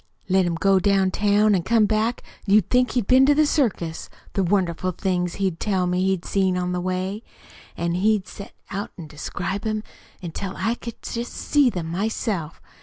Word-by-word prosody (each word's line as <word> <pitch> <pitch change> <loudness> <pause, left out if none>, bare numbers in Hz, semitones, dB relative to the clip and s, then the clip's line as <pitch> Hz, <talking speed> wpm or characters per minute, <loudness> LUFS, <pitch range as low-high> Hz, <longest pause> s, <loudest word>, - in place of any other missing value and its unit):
Let 190 -1 +3
him 170 - -1
go 190 +3 +3
downtown 205 +2 +3
an' 185 - +2
come 225 +4 +3
back 220 +3 0 0.2
you'd 200 -1 +4
think 250 0 +3
he'd 245 -5 0
been 255 +4 +5
to 290 - +5
the 305 +1 +4
circus, 215 - -1 0.2
the 195 - +1
wonderful 185 -1 0
things 180 -1 -1
he'd 190 -4 -1
tell 190 -4 0
me 180 +1 0
he'd 190 -2 0
seen 190 -2 +1
on 180 0 -1
the 180 0 -1
way. 185 +3 -2 0.6
An' 170 0 -1
he'd 200 +1 +1
set 200 - -9 0.2
'em 195 - -3
out 205 - -5
an' 170 - -7
describe 175 +6 -4
'em 215 0 -2 0.4
until 185 +2 -5
I 225 - 0
could 235 -1 -8
just 235 +1 -4
see 285 -4 +2
'em 165 -2 -3
myself! 195 -3 -2
195 Hz, 185 wpm, -23 LUFS, 180-215 Hz, 0.6 s, been